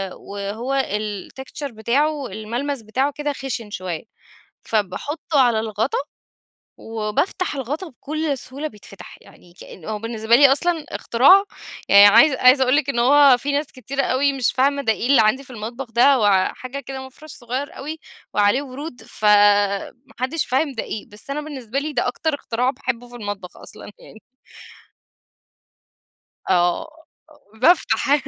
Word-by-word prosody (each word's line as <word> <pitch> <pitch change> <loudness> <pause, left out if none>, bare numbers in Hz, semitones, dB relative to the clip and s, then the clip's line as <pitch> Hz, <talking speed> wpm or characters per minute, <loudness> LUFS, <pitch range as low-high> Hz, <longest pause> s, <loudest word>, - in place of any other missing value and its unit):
وهو 220 +7 -3
الtexture 215 +7 -5
بتاعه 275 +6 0
الملمس 235 +6 -4
بتاعه 260 +7 -1
كده 295 0 -2
خشن 250 -5 -5
شويّة، 180 -5 -5 0.6
فباحطه 280 - -1
على 240 -4 +3
الغطا 220 +3 -2 0.8
وبافتح 225 - -2
الغطا 290 +8 -4
بكل 300 +2 -3
سهولة 280 +5 -6
بيتفتح، 205 -5 -13
يعني 175 - -19
كأنّ 170 - -12
هو 215 -1 -4
بالنسبة 225 0 +1
لي 275 +1 +7
أصلًا 320 +3 +1
اختراع 325 +12 +4 0.5
يعني، 200 +1 +9
عايزة 240 +7 +5
عايزة 255 +1 +6
أقول 255 +1 +2
لِك 290 -2 +1
إن 240 -4 -1
هو 275 +1 +6
في 285 +4 -3
ناس 290 +2 -1
كتيرة 265 +2 -4
أو 260 - 0 0.2
مش 250 - +1
فاهمة 280 +2 +1
ده 225 -4 +2
إيه 235 - -4
اللي 270 -4 +5
عندي 220 +6 +2
في 265 - -19
المطبخ 235 +2 -7
ده 245 +5 +5
هو 200 -6 +3
حاجة 255 +2 -7
كده 265 0 -7
مَفرش 305 +4 -15
صغيّر 255 +4 -5
أوي 305 +3 -6 0.3
وعليه 205 +6 +3
ورود 275 0 -8
فما 205 -1 +3 0.3
حدش 265 +5 -1
فاهم 275 +3 0
ده 225 - -4
إيه، 210 - -7
بس 210 +6 -14
أنا 290 +2 -2
بالنسبة 275 -4 -5
لي 300 +1 -5
ده - - 0
أكتر 300 +5 -1
اختراع 250 -2 -1
باحبّه 245 -2 -4
في 245 - -12
المطبخ 205 -5 -7
أصلًا - - -11
يعني. 220 - -15 2.3
آه، 175 -1 +2 0.7
بافتح 295 -3 +3
255 Hz, 150 wpm, -21 LUFS, 215-280 Hz, 2.3 s, يعني